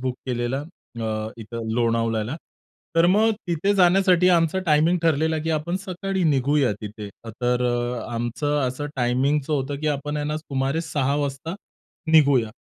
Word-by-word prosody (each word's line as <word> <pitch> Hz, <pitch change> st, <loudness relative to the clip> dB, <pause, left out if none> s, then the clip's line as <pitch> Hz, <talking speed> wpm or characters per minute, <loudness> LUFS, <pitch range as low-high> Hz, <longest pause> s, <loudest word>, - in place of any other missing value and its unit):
Book 130 Hz, -1 st, -2 dB
केलेला, 120 Hz, +1 st, -1 dB, 0.4 s
अ, 110 Hz, 0 st, -2 dB
इथं 115 Hz, +1 st, -6 dB
लोणावळ्याला. 115 Hz, +1 st, 0 dB, 0.6 s
तर 165 Hz, +1 st, +6 dB
मगं 215 Hz, +5 st, +4 dB, 0.2 s
तिथे 175 Hz, +4 st, +1 dB
जाण्यासाठी 180 Hz, -1 st, +4 dB
आमचा 170 Hz, 0 st, +3 dB
टायमिंग 160 Hz, +3 st, +3 dB
ठरलेला 160 Hz, 0 st, +2 dB
की 165 Hz, -, -1 dB
आपण 160 Hz, +3 st, -1 dB
सकाळी 190 Hz, +1 st, -3 dB
निघूया 140 Hz, -3 st, +2 dB
तिथे, 105 Hz, 0 st, -7 dB, 0.2 s
तर 120 Hz, +2 st, -1 dB
अ, 120 Hz, 0 st, -1 dB
आमचं 120 Hz, +6 st, -1 dB
असं 130 Hz, +4 st, -4 dB
टायमिंगचं 135 Hz, +4 st, +1 dB
होतं, 140 Hz, -1 st, -1 dB
की 155 Hz, -, -3 dB
आपण 145 Hz, 0 st, -2 dB
आहे 145 Hz, 0 st, -2 dB
ना 150 Hz, +1 st, -1 dB
सुमारे 140 Hz, 0 st, -2 dB
6 145 Hz, -4 st, -1 dB
वाजता 145 Hz, +3 st, -3 dB, 0.6 s
निघूया. 140 Hz, -8 st, +5 dB
145 Hz, 145 wpm, -23 LUFS, 120-160 Hz, 0.6 s, तर